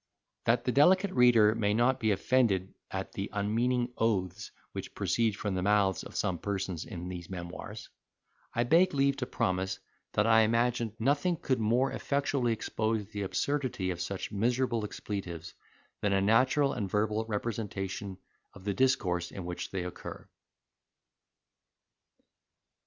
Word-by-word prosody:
That 120 +1 +3
the 125 - +2
delicate 185 +8 +5
reader 120 -6 +6
may 105 -2 +1
not 125 +3 +3
be 110 -3 +1
offended 100 -3 +2 0.2
at - - -4
the 95 - -4
unmeaning 120 +4 0
oaths 105 -2 0 0.2
which - - -7
proceed 115 -3 +1
from 105 -2 -2
the 95 - -1
mouths 100 -2 +2
of - - -11
some 90 -3 -1
persons 95 -4 -3
in 90 0 -6
these 90 -2 -7
memoirs, 95 +4 -7 0.6
I 120 - +1
beg 165 +7 +4
leave 140 0 +2
to 125 - -3
promise, 95 0 -1 0.4
that 105 - +2
I 115 0 +6
imagined 115 0 +1
nothing 145 +9 +2
could 130 -5 0
more 120 +5 +2
effectually 140 -3 0
expose 110 -1 -1
the 105 - -4
absurdity 120 -2 -1
of 90 -1 -4
such 100 0 -4
miserable 120 +2 +1
expletives, 95 -5 -5 0.5
than 100 -1 +1
a 95 - +3
natural 130 +7 +3
and 100 -2 -3
verbal 105 +2 +1
representation 100 -3 -4 0.4
of 95 - -12
the 100 0 -1
discourse 90 -7 +1
in 95 - -7
which 90 0 -4
they 95 -2 -3
occur. 90 - -8
110 Hz, 145 wpm, -30 LUFS, 95-125 Hz, 0.6 s, reader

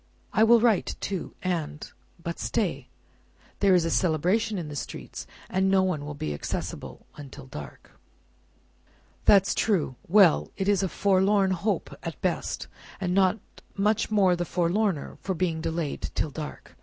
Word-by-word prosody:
I 220 - +4
will 235 +1 +7
write 225 -4 +2
too, 190 -3 -4
and 165 -5 -2 0.4
But 170 0 -4
stay! - - -1 0.7
There 195 -2 +5
is 175 -2 +3
a 165 - 0
Celebration 185 +6 +1
in 170 -4 -4
the 150 - -7
streets, - - -7 0.2
and 190 +1 +1
no 190 -1 +4
one 175 -6 -1
will 150 - -5
be 75 - -3
accessible 75 - -5
until 140 -2 -10
dark." 75 - -10 1.3
"That's 195 -1 +6
true. 170 - 0
Well! 190 -2 +5
It 195 -1 -1
is 205 -2 +3
a 190 - 0
forlorn 195 +1 +3
hope 185 +4 -1
at - - -4
the - - -29
best, - - -3 0.3
and 180 -2 -1
not 190 +1 +3 0.4
much 210 +2 +1
the 185 -5 +3
forlorner 180 -1 0
for 190 - -2
being 165 -2 -1
delayed 160 -2 -2
till 150 - -1
dark. 150 0 -8
185 Hz, 155 wpm, -27 LUFS, 160-200 Hz, 1.3 s, will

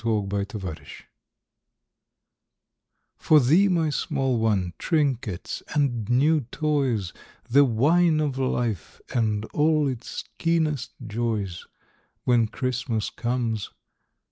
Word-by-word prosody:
WHEN 110 -3 0
CHRISTMAS 100 0 -2
COMES 95 -6 -6 2.3
For 155 - +5
thee, 160 +10 +4
my 165 -5 +1
small 135 -5 0
one 100 -6 +1
trinkets 130 - -1
and 120 -7 0
new 145 +5 +3
toys, 135 - 0 0.3
The 140 +4 +6
wine 155 +7 +3
of 140 -3 -1
life 120 -7 -2
and 110 -3 0
all 155 -1 +3
its 125 -3 -5 0.2
keenest 155 -6 0
joys, 105 -5 -3 0.6
When 120 -3 +3
Christmas 125 -3 -2
comes. 120 -3 -2
125 Hz, 100 wpm, -25 LUFS, 110-150 Hz, 2.3 s, The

